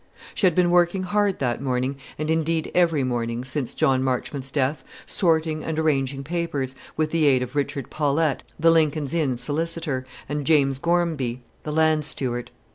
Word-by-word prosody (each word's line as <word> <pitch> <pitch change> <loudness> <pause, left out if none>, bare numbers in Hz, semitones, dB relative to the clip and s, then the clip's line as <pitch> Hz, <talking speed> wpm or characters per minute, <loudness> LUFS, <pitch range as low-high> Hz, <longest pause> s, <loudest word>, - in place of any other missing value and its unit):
She 195 - +3
had 175 - +1
been 180 -1 +3
working 175 +2 +3
hard 205 +1 +1
that 120 -2 -1
morning, 130 0 -1 0.2
and 155 +1 -1
indeed 160 0 0
every 165 -5 +3
morning 120 -1 -2
since 130 -1 -3
John 130 -1 +2
Marchmont's 130 +1 -2
death, 140 +1 0 0.2
sorting 160 -3 +1
and 160 -1 -3
arranging 140 -3 0
papers, 145 -4 -2 0.2
with 155 -1 0
the 160 -3 +3
aid 130 -2 +4
of 125 +3 -8
Richard 140 -1 -2
Paulette, 150 -1 +1 0.2
the 165 +1 +5
Lincoln's 155 -3 +2
Inn 145 -7 +1
solicitor, 155 -1 -2 0.2
and 145 +1 -2
James 135 -4 +3
Gormby, 160 -8 0 0.2
the 150 - -5
land 155 0 +3
steward. 120 -4 -3
150 Hz, 165 wpm, -24 LUFS, 130-165 Hz, 0.2 s, the